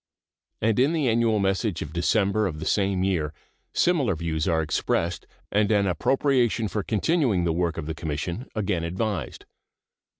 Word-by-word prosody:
And 110 +1 +2
in 140 +6 +3
the 155 -5 +1
annual 115 -1 +2
message 95 -1 0
of 75 - -10
December 100 +4 +2
of 80 -5 -5
the 80 - -5
same 95 -2 +1
year 80 -6 -1 0.4
similar 145 - +2
views 80 0 -2
are 80 -2 +2
expressed 85 +2 -1 0.2
and 105 +1 +2
an 100 -2 +3
appropriation 120 - +1
for 105 +1 -2
continuing 115 - +1
the 85 -1 +1
work 85 -1 -1
of 80 - -4
the 80 - -3
Commission 80 - -4
again 95 -6 -1
advised. 95 +2 -3
95 Hz, 160 wpm, -25 LUFS, 85-115 Hz, 0.4 s, in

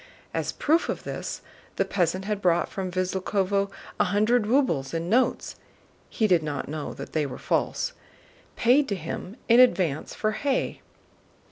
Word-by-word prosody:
As - - -1
proof 320 +3 +1
of - - -3
this - - -5 0.3
the - - +1
peasant 185 +1 0
had 210 -1 -2
brought 175 -2 +2
from 190 -2 -4
Visloúkhovo 190 +2 0 0.3
a - - +6
hundred 210 +4 +2
rubles 170 - +1
in 165 +3 -2
notes 255 +3 +1 0.5
(he 220 - 0
did 180 -5 +4
not 150 -2 -4
know 150 0 -4
that - - -8
they 155 -2 +1
were 130 - -7
false) - - -1 0.6
paid 265 +4 +4
to 200 - 0
him 180 +5 -6
in 235 +1 +6
advance 180 - +3
for 215 - 0
hay. 270 +4 -1
195 Hz, 155 wpm, -26 LUFS, 170-230 Hz, 0.6 s, a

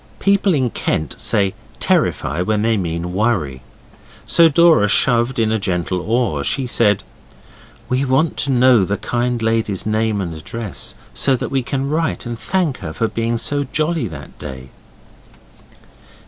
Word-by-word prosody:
People 200 -2 +2
in 130 -4 0
Kent 80 - -2
say 100 -2 +2 0.3
terrify 90 - 0
when 105 +3 0
they 115 0 +2
mean 85 -2 -3
worry. 95 - 0 0.6
So 165 -1 +5
Dora 160 -7 +5
shoved 120 +3 +2
in 110 -1 +1
a 110 - +1
gentle 90 -1 -2
oar. 110 - 0
She 135 - +1
said 110 -4 +2 0.8
'We 130 +2 0
want 135 +5 +1
to 140 - +1
know 125 -4 +5
the 100 +2 -1
kind 120 0 -1
lady's 110 -4 0
name 110 -1 0
and 90 -4 -3
address, 100 +6 -5 0.2
so 135 - +2
that 125 - -4
we 135 -1 +1
can 135 +2 -3
write 160 0 -1
and 120 0 -4
thank 150 +5 -1
her 80 - -6
for 115 - 0
being 115 0 -1
so 145 +5 +1
jolly 155 0 -1
that 80 -6 -11
day. 65 -2 -8
115 Hz, 155 wpm, -18 LUFS, 95-135 Hz, 0.8 s, So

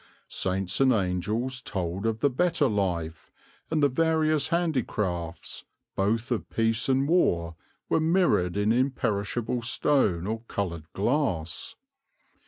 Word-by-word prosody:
Saints 95 0 -1
and 135 -1 +5
angels 110 +5 -1
told 95 -1 -3
of 110 0 -2
the 145 - +4
better 165 +1 +2
life, 90 -7 -2 0.4
and 155 -2 +1
the - - +7
various 155 +1 +2
handicrafts, 105 - -2 0.3
both 110 +5 0
of 120 - -2
peace 115 +2 +1
and 135 +1 +2
war, 85 - +2 0.3
were - - +2
mirrored 160 - +2
in 105 +1 +2
imperishable 120 -2 0
stone 115 - +1
or 110 +2 -2
coloured 85 -5 -4
glass. 100 - -1
115 Hz, 120 wpm, -27 LUFS, 95-135 Hz, 0.4 s, the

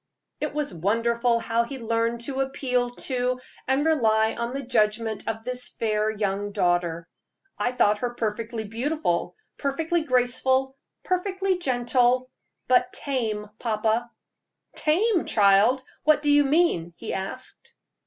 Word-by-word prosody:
It - - -3
was 295 -9 -1
wonderful 230 +6 +1
how 230 0 0
he 265 +3 -7
learned 230 0 -1
to 270 +2 -2
appeal 250 -2 0
to 250 0 -1 0.3
and 270 +3 +2
rely 220 -8 +3
on 235 +1 -3
the 275 +1 -4
judgment 220 -3 0
of 225 0 -3
this 250 +1 -3
fair 215 -1 0
young 205 -1 -2
daughter. 175 -3 0 0.5
"I 245 - +1
thought 210 -4 +2
her 240 0 -3
perfectly 225 0 -3
beautiful, 230 - -2 0.2
perfectly 320 +4 0
graceful, 260 0 +1 0.3
perfectly 380 0 0
gentle, 250 -2 +1 0.4
but 250 0 +3
tame, 220 -7 -2
papa." 225 +1 0 0.7
"Tame, 360 +5 +2
child! 210 +6 +4 0.2
What 305 0 +4
do 295 - +3
you 290 0 +5
mean?" 270 - +2
he - - -5
asked. 195 +7 -6
240 Hz, 130 wpm, -25 LUFS, 220-270 Hz, 0.7 s, you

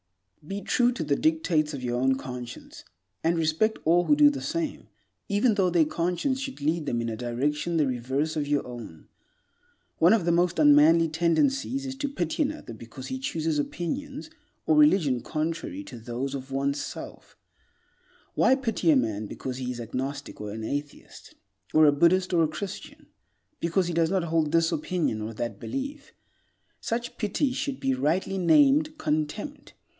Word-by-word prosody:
Be 195 +3 -4
true 245 0 +3
to 235 - -3
the 145 -2 +1
dictates 170 - +1
of 130 - -7
your 120 0 -1
own 130 0 +3
conscience, 125 -2 -8 0.4
and 165 +1 +2
respect 165 +8 +1
all 175 +2 +4
who 295 - +4
do 295 0 +6
the 285 - -5
same, 325 -2 -3 0.4
even 210 +3 +3
though 195 -3 +2
their 170 -2 +3
conscience 180 - -1
should 270 0 -6
lead 155 +1 -1
them 120 - 0
in 115 0 -2
a 110 - -3
direction 145 +8 -1
the 155 - +3
reverse 130 +5 -1
of 150 -2 -1
your 145 -1 0
own. 115 -10 -10 0.9
One 170 +5 +6
of 215 -7 +2
the 170 - +3
most 175 +1 +2
unmanly 155 +2 +6
tendencies 265 - +1
is 265 - -4
to 285 0 -2
pity 175 - -2
another 300 - -3
because 115 +4 -10
he 260 - -4
chooses 160 - -1
opinions 275 - -4 0.3
or 315 - +3
religion 185 - +4
contrary 165 - -3
to 120 - -10
those 120 +4 -4
of 135 -1 -6
one's 140 +1 -1
self. - - -9 1.0
Why 265 - +4
pity 225 -10 -1
a 155 - +6
man 110 -4 0
because 130 +3 -6
he 130 -1 -4
is 125 - -4
an 115 -2 -7
agnostic, 140 +2 -5
or 105 - -5
an 110 +1 -6
atheist, 145 +5 -6 0.4
or 155 0 +6
a 145 - +7
Buddhist, 175 +5 +3
or 170 - +4
a - - +3
Christian? 155 +5 -7 0.5
Because 170 +2 +1
he 175 - -3
does 165 -1 +2
not 190 -1 +1
hold 160 -2 0
this 165 +1 +3
opinion 160 -7 -1
or 110 +1 -5
that 120 +2 -4
belief? 280 +2 -5 0.7
Such 240 +1 -4
pity 235 +6 0
should 275 0 -3
be 135 - +1
rightly 165 +9 0
named 295 - +4
contempt. 170 - -3
165 Hz, 175 wpm, -27 LUFS, 140-225 Hz, 1.0 s, a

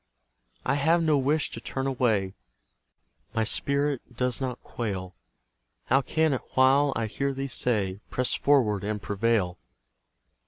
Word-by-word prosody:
I - - +2
have 165 +3 +3
no 155 -2 +3
wish 145 +3 +1
to - - -7
turn 135 0 -3
away; 115 -8 +1 1.0
My 110 - +2
spirit 140 0 -1
does 125 0 0
not 130 -2 -4
quail, 95 -6 -4 0.7
How 135 - +3
can 160 +2 +1
it 130 - -2
while 135 +2 +5
I 115 - 0
hear 135 +5 -2
thee 135 +1 -3
say, 105 -7 0
"Press 125 0 +1
forward 110 -9 +2
and 105 +1 -2
prevail!" 100 -3 0
125 Hz, 140 wpm, -27 LUFS, 105-140 Hz, 1.0 s, while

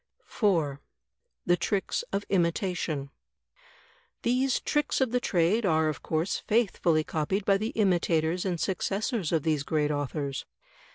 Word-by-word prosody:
4, 160 - 0 0.6
The 175 - +4
Tricks 190 +3 -1
of 200 +1 -2
Imitation 170 -5 0 1.1
These 255 +2 +2
tricks 295 -1 0
of 260 -4 +1
the 250 - +2
trade 190 +2 +2
are 160 -4 +2
of 155 - -5
course 160 +4 -1
faithfully 180 -8 +1
copied 175 +7 -2
by 195 -1 +4
the 215 +2 -1
imitators 175 -4 +2
and 180 -3 -2
successors 195 - -1
of 160 -4 +1
these 155 -3 +1
great 150 0 0
authors. 145 -1 -3
175 Hz, 130 wpm, -28 LUFS, 155-205 Hz, 1.1 s, The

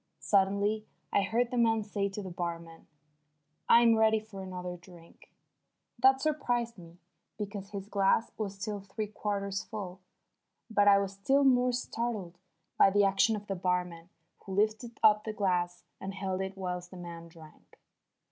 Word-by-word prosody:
Suddenly 200 +2 +1 0.3
I - - +4
heard 230 +5 0
the 250 - 0
man 225 -2 +3
say 205 -1 -2
to 200 +1 -6
the 185 - -6
barman: 170 -1 -6 0.8
"I'm 235 0 +7
ready 220 0 +4
for 215 -2 -10
another 180 -1 -6
drink." 175 -1 -17 0.7
That 265 +1 +6
surprised 245 -6 -1
me, 170 -2 -14 0.4
because 200 -2 -5
his 200 -1 -6
glass 200 +2 +2
was 200 -3 -4
still 205 +1 -4
three 200 +2 -5
quarters 200 -2 -3
full. 190 -4 -7 0.7
But 205 -2 +3
I 200 -1 +8
was 195 -1 -1
still 270 +9 +2
more 250 -2 +4
startled 230 -7 -3 0.4
by - - +8
the 205 +1 +3
action 195 +3 +3
of 205 -1 -7
the 200 - -3
barman 180 -2 -2 0.3
who 195 - -8
lifted 215 +4 0
up 210 0 +6
the 215 - -4
glass 180 -3 0 0.2
and 195 0 -6
held 190 -1 -2
it 190 0 -5
whilst 180 -2 -4
the 185 - -11
man 170 -1 -8
drank. 165 -2 -17
200 Hz, 160 wpm, -30 LUFS, 185-220 Hz, 0.8 s, I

